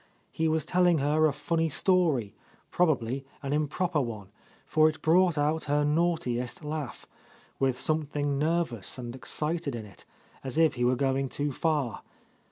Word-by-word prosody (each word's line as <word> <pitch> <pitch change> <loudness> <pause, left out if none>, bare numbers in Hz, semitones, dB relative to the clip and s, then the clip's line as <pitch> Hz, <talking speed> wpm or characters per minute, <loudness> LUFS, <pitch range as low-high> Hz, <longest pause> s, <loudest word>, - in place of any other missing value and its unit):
He 160 - 0
was 160 -1 +1
telling 180 -1 +3
her 150 +2 +3
a - - +1
funny 160 +3 -1
story, 155 - +2 0.4
probably 135 -6 +1 0.2
an 140 +1 -2
improper 155 +2 0
one, 110 -6 -5 0.4
for 155 0 +4
it 155 - -7
brought 175 0 +4
out 150 +2 0
her 145 0 +1
naughtiest 150 -3 0
laugh, 150 -5 -5 0.5
with 130 -2 +1
something 145 -2 -1
nervous 155 - -1
and 120 -1 -6
excited 150 +1 -2
in 110 -2 -6
it, 100 -4 -14 0.4
as 135 +2 -4
if 160 -1 +4
he 125 - -2
were 125 +1 +3
going 135 0 0
too 145 +2 -2
far. 140 -7 -1
150 Hz, 155 wpm, -28 LUFS, 130-160 Hz, 0.5 s, for